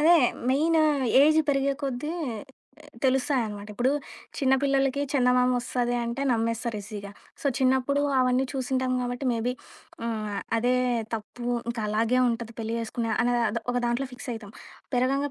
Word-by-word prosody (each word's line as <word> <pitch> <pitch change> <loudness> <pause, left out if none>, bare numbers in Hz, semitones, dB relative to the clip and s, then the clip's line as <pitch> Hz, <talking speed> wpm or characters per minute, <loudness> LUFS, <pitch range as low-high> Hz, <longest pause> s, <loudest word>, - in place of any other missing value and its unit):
అదే 335 +3 +7 0.3
main 315 +5 +3 0.5
age 310 +1 +5
పెరిగే 275 0 +2
కొద్దీ, 275 +2 -2 0.9
తెలుస్తాయనమాట. 245 -6 0
ఇప్పుడు 245 +4 +2 0.5
చిన్న 265 -2 +3
పిల్లలకి 275 0 +2
చందమామొస్తది 250 -1 +2
అంటే 235 +4 -3
నమ్మేస్తారు 230 0 0
ఈజీగా. 200 -1 -7 0.3
సో 300 - -2
చిన్నప్పుడు 265 +2 +2 0.2
అవన్నీ 255 +1 +2
చూసింటాం 260 -1 -1
గాబట్టి, 245 +2 -3
మేబీ 235 +2 -1 0.5
హ్మ్. 230 - -1 0.3
ఆహ్, - - -2 0.2
అదే 245 +2 +2 0.4
తప్పు. 225 +2 -7 0.2
ఇంకాలాగే 225 +2 0
ఉంటది 230 -1 -3
పెళ్లి 225 +1 -3
జేసుకునే 230 0 -3
అనేద 245 0 +2
అదో 230 +2 -3
ఒక - - -2
దాంట్లో 245 +3 -1
ఫిక్స్ 250 +1 -7
అయితం. 215 -2 -9 0.4
పెరగంగా 275 +3 +1
250 Hz, 135 wpm, -26 LUFS, 230-270 Hz, 0.9 s, అదే